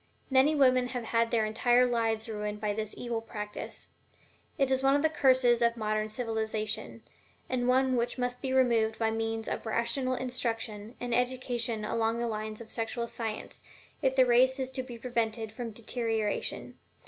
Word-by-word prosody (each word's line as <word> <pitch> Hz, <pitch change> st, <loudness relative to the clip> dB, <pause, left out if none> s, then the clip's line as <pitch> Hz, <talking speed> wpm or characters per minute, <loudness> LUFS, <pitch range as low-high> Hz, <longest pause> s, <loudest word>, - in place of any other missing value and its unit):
Many 270 Hz, +4 st, +5 dB
women 255 Hz, -3 st, +4 dB
have 245 Hz, -1 st, -4 dB
had 230 Hz, 0 st, +1 dB
their 225 Hz, -2 st, +2 dB
entire 240 Hz, +3 st, +3 dB
lives 225 Hz, -2 st, 0 dB
ruined 210 Hz, -1 st, -4 dB
by 210 Hz, -1 st, -1 dB
this 215 Hz, 0 st, -4 dB
evil 235 Hz, -2 st, -3 dB
practice. 210 Hz, -2 st, -7 dB, 0.7 s
It 275 Hz, -3 st, +2 dB
is 265 Hz, 0 st, +2 dB
one 270 Hz, +1 st, +4 dB
of 285 Hz, -, +1 dB
the 315 Hz, -, +4 dB
curses 255 Hz, -5 st, +4 dB
of 235 Hz, 0 st, +3 dB
modern 215 Hz, -1 st, -1 dB
civilization, 220 Hz, -2 st, -3 dB, 0.4 s
and 245 Hz, -1 st, -1 dB
one 260 Hz, 0 st, +3 dB
which 240 Hz, +1 st, -1 dB
must 250 Hz, 0 st, -2 dB
be 265 Hz, -, -2 dB
removed 235 Hz, -4 st, +3 dB
by 225 Hz, -1 st, +1 dB
means 225 Hz, 0 st, -2 dB
of -, -, -3 dB
rational 255 Hz, +3 st, 0 dB
instruction 230 Hz, -3 st, -3 dB
and 245 Hz, -1 st, -3 dB
education 245 Hz, -3 st, -1 dB
along 225 Hz, +1 st, 0 dB
the 235 Hz, -, -1 dB
lines 215 Hz, 0 st, -4 dB
of 225 Hz, -, -9 dB
sexual 235 Hz, +1 st, -2 dB
science 225 Hz, -2 st, -5 dB, 0.4 s
if 265 Hz, -2 st, +2 dB
the 260 Hz, -1 st, +6 dB
race 255 Hz, +2 st, +4 dB
is 260 Hz, 0 st, -3 dB
to 260 Hz, -, -3 dB
be 250 Hz, -2 st, -8 dB
prevented 225 Hz, -2 st, -2 dB
from 235 Hz, 0 st, -5 dB
deterioration. 225 Hz, -1 st, -2 dB
235 Hz, 170 wpm, -30 LUFS, 220-255 Hz, 0.7 s, the